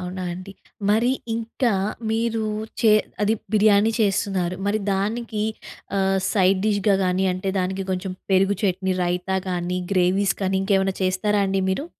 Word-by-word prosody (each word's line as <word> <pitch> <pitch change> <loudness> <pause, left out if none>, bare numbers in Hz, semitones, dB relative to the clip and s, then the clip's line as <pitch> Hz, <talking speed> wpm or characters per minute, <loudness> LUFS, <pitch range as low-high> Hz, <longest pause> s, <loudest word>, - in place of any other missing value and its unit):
అవునా 185 0 -5
అండి. 185 +2 -8 0.4
మరి 230 +4 +3 0.2
ఇంకా 230 +1 -1 0.4
మీరు 225 0 0 0.4
చే 220 - +5 0.3
అది 215 +2 +3 0.2
బిర్యానీ 210 0 +4
చేస్తున్నారు, 195 -3 0
మరి 210 +1 +1
దానికి 215 +2 -2 0.6
ఆహ్, 195 0 +2
సైడ్ 190 -2 +3
డిష్‍గా 205 -1 +2
గానీ, 185 +1 +1
అంటే 185 +2 -4
దానికి 190 +1 -2
కొంచెం 185 0 -2 0.2
పెరుగు 195 +1 +3
చట్నీ, 190 -1 0
రైతా 180 +2 -1
గానీ, 180 0 -2
గ్రేవీస్ 190 +1 +2
కానీ 190 0 +1
ఇంకేమన్నా 195 -1 +1
చేస్తారా 200 +3 +1
అండి 190 0 0
మీరు? 275 +11 -2
195 Hz, 140 wpm, -23 LUFS, 185-210 Hz, 0.6 s, చే